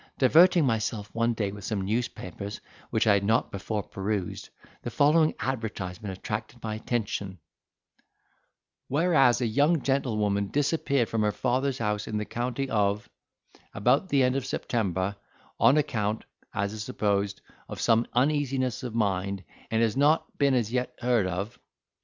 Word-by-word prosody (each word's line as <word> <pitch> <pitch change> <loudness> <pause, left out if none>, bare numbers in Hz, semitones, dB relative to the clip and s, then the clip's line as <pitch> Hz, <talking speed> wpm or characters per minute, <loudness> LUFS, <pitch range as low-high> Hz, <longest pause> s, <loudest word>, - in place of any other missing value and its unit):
Diverting 165 +5 +6
myself 110 -3 -1
one 115 0 +1
day 105 -3 -1
with 100 0 -9
some 105 -1 -2
newspapers, 100 -2 -3 0.3
which 110 - +1
I 105 - +6
had 100 -1 +2
not 110 +3 +1
before 100 +1 -3
perused, 100 -1 -4 0.3
the - - -4
following 155 +2 +3
advertisement 100 -6 -4
attracted 115 +4 -5
my 110 -1 -2
attention: 105 -4 -3 1.5
'"Whereas 135 -5 +3
a - - +2
young 145 +8 +2
gentlewoman 105 -7 0
disappeared 140 -4 +1
from 115 - -1
her 105 0 +2
father's 130 +3 0
house 105 -3 -2
in 110 - -2
the 105 - -2
county 125 +4 -2
of 105 -2 0 0.3
—, - - -29
about 125 - +2
the 140 -4 +3
end 125 +1 +2
of 135 - -1
September, 100 -6 -2 0.4
on 140 - +5
account 110 -7 -1 0.3
(as 100 +1 -2
is 110 -1 -5
supposed) 100 -5 -1 0.3
of - - -6
some 115 0 +3
uneasiness 130 -2 +1
of 120 -3 -5
mind, 100 -3 0 0.3
and 115 0 +2
has 110 -2 +1
not 145 +4 +2
been 140 -2 +4
as 115 -2 0
yet 125 -1 -1
heard 120 -5 +2
of. 100 +7 -4
115 Hz, 150 wpm, -27 LUFS, 105-130 Hz, 1.5 s, Diverting